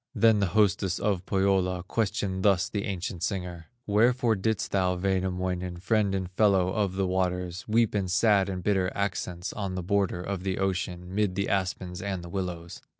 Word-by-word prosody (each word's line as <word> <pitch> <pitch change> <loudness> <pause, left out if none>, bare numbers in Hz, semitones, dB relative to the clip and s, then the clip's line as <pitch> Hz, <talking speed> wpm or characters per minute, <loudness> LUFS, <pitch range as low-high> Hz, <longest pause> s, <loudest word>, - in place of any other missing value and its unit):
Then 110 -2 +5
the 100 - +2
hostess 95 -3 +2
of 95 -3 -1
Pohyola 95 -2 +1
Questioned 95 -2 -1
thus 95 -2 +3
the 100 -2 -3
ancient 95 -2 -4
singer: 90 -4 -3 0.2
"Wherefore 115 +2 +3
didst 110 +2 -1
thou, 90 -2 +2
Wainamoinen, 90 -1 -1
Friend 100 +1 +1
and 95 -2 -3
fellow 95 -2 +3
of 100 -1 0
the 95 0 +1
waters, 90 -1 -1
Weep 115 0 +2
in 100 -3 0
sad 100 +1 +3
and 90 -2 -4
bitter 95 -2 +1
accents, 90 -3 -3
On 100 -3 -4
the 90 - -3
border 95 -1 0
of 95 -1 -3
the 95 0 -2
ocean, 90 -1 -2
Mid 100 -2 +1
the 100 0 0
aspens 95 -2 -2
and 95 -3 -3
the 85 - -8
willows?" 85 -2 -5
95 Hz, 175 wpm, -27 LUFS, 90-100 Hz, 0.2 s, Then